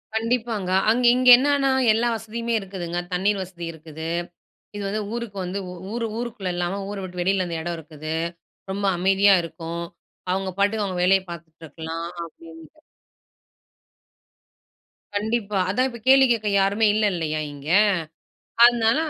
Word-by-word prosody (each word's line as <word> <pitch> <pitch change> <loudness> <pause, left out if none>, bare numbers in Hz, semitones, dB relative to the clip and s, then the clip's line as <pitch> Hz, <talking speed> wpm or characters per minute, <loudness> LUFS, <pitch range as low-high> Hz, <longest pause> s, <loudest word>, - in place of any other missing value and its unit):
கண்டிப்பாங்க. 225 -4 -1 0.2
அங் 240 +3 +2
இங்க 255 0 +4
என்னன்னா 275 0 +2 0.2
எல்லா 230 +2 +1
வசதியுமே 230 +1 -4
இருக்குதுங்க, 185 -3 -5 0.2
தண்ணீர் 195 +3 +1
வசதி 175 -2 -8
இருக்குது. 160 0 -8 0.7
இது 205 - -4
வந்து 210 +2 -2
ஊருக்கு 235 -4 -5
வந்து 180 +2 -3
உ - - -7 0.2
ஊர் 235 0 -2
ஊருக்குள்ள 230 -6 -4
இல்லாம 175 +3 -2
ஊர 205 - -5
விட்டு 180 -1 -6
வெளியில 185 +1 +1
அந்த 170 -1 -4
இடம் 170 +1 -3
இருக்குது, 155 0 -7 0.6
ரொம்ப 200 +1 -3
அமைதியா 195 +2 +5
இருக்கும். 165 0 -6 0.5
அவங்க 190 0 -1
பாட்டுக்கு 205 +1 +1
அவங்க 185 -2 -4
வேலைய 190 +1 +4
பார்த்துட்டு 165 -1 -11
இருக்கலாம் 165 +1 -6 0.2
அப்படின்ட்டு. 165 - -15 2.4
கண்டிப்பா 210 -1 -1
அதா 215 +7 +1
இப்ப 235 -2 -10
கேள்வி 270 0 +7
கேட்க 220 -3 0
யாருமே 200 +3 +2
இல்ல 215 0 +2
இல்லையா 155 -3 -2
இங்க. 140 0 -11 1.0
அதனால 235 0 +5
195 Hz, 140 wpm, -23 LUFS, 170-225 Hz, 2.4 s, கேள்வி